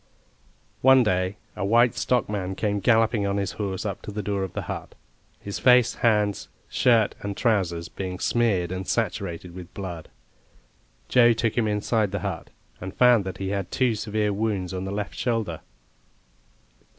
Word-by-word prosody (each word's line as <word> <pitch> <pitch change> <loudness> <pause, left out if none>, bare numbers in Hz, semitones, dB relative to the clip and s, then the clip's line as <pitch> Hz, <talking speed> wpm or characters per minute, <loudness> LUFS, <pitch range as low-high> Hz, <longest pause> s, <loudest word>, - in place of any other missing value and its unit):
One 130 -1 +6
day 95 -1 0 0.2
a - - -4
white 115 +4 +4
stockman 105 -6 -1
came 105 0 -1
galloping 110 0 +2
on 100 0 -1
his 100 -1 -1
horse 100 -1 -4
up 100 -2 -4
to - - -7
the 105 0 -4
door 100 0 -1
of 95 - -5
the - - -4
hut, - - -7 0.4
his 100 - -6
face, 125 -2 +5
hands, 105 -3 +1 0.2
shirt 115 -4 +3
and 100 -1 -5
trousers 90 -8 0
being 90 -1 -5
smeared 100 -6 +1
and 95 0 -4
saturated 90 -6 -2
with 90 -1 -10
blood. 90 -5 -6 1.0
Joe 120 -2 +5
took 115 -1 -1
him 115 -3 +1
inside 105 0 0
the 100 -1 -4
hut, - - -4 0.3
and 95 +2 -7
found 125 -5 +5
that 95 - -5
he 95 -1 -3
had 100 -2 -2
two 125 +1 +1
severe 105 -1 -1
wounds 100 -3 -2
on 95 0 -4
the 95 - -4
left 105 0 -4
shoulder. 115 -9 -2
100 Hz, 165 wpm, -25 LUFS, 95-115 Hz, 1.0 s, One